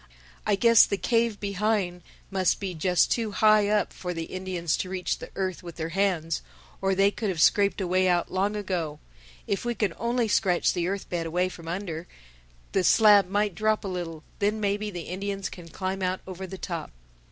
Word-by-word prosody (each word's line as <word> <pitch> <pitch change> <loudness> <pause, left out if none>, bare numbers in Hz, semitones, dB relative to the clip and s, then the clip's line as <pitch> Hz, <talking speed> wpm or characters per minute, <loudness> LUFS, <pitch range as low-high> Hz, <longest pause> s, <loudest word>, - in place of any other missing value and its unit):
I 210 - +4
guess 230 +2 +6
the 200 - -1
cave 230 -1 +1
behind 200 -3 -1 0.3
must 190 -2 +1
be 195 -2 -3
just 180 +2 +2
too 225 -3 0
high 215 0 +5
up 210 -2 +1
for 180 -1 -5
the 165 - -3
Indians 180 -2 -2
to 185 - -3
reach 185 -1 -2
the - - -8
earth 185 -2 -2
with 170 -2 -9
their 160 0 -4
hands, 170 -3 0 0.4
or 195 0 +1
they 195 +1 +4
could 215 0 -3
have 180 -4 -3
scraped 200 +4 +4
a 190 - -1
way 185 +1 +2
out 175 -1 +1
long 195 +3 0
ago. 180 -7 -2 0.5
If 200 - -2
we 240 0 -1
can 205 -5 0
only 235 0 +1
scratch 190 -4 +2
the 175 -1 -1
earth 195 +1 -3
bed 170 -2 -2
away 180 +3 0
from 170 -2 -11
under, 170 -2 -4 0.6
the 190 - +1
slab 205 -1 +6
might 205 0 +1
drop 215 +2 0
a - - -2
little. 170 -4 -5 0.2
Then 210 +2 +1
maybe 205 0 -1
the 180 -4 -6
Indians 195 +3 -4
can 175 -2 -11
climb 190 +3 -4
out 185 0 -1
over 190 0 -7
the 190 - -7
top." 170 -4 -5
190 Hz, 200 wpm, -27 LUFS, 175-205 Hz, 0.6 s, guess